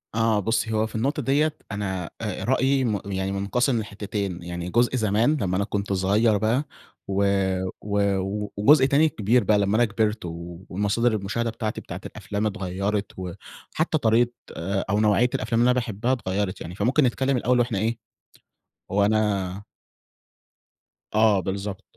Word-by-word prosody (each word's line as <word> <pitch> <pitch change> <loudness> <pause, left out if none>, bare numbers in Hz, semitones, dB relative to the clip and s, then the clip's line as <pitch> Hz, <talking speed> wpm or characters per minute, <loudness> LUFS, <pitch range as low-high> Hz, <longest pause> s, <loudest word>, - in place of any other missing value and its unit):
آه، 115 -2 +2
بُصّي 110 +2 0
هو 110 0 +1
في 110 - -11
النقطة 140 +7 0
دِيَّة، 150 +4 +1 0.2
أنا 95 -4 -3
آآ 105 -4 -3
رأيي 130 +1 +2
م 100 -4 -2
يعني 95 0 -1
منقسم 115 +5 +1
لحتتين، 100 -4 -4
يعني 85 0 -5
جزء 120 +6 +2
زمان 110 +6 +2
لمّا 95 -1 0
أنا 100 - +1
كنت 100 -1 -2
صغير 105 +4 +3
بقى 115 +7 +1 0.4
و 100 +1 +1 0.6
و 105 0 -1 0.6
وجزء 130 +6 +6
تاني 145 +3 +4
كبير 115 +1 +2
بقى 105 +1 +3
لمّا 100 +1 +1
أنا 120 - +5
كبرت 110 0 0
ومصادر 95 +7 -2
المشاهدة 115 +3 -2
بتاعتي 110 -1 -4
بتاعة - - -8
الأفلام 105 +1 -4
اتغيرت 100 0 -2
وحتى 95 - -4
طريقة 120 -2 +3 0.6
أو 100 - +2
نوعية 110 +3 +3
الأفلام 115 +1 0
اللي 125 +1 +5
أنا - - +3
باحبها 115 0 -2
اتغيرت 100 -4 -2
يعني. 85 - -7
فممكن 125 +9 +2
نتكلم 130 +1 +1
الأول 125 +1 +2
وإحنا 115 -4 +1
إيه 115 +3 -1 0.9
وأنا 100 -2 +1 1.5
آه، 110 -2 +5
بالضبط. 100 +1 -4
105 Hz, 150 wpm, -24 LUFS, 100-120 Hz, 1.5 s, وجزء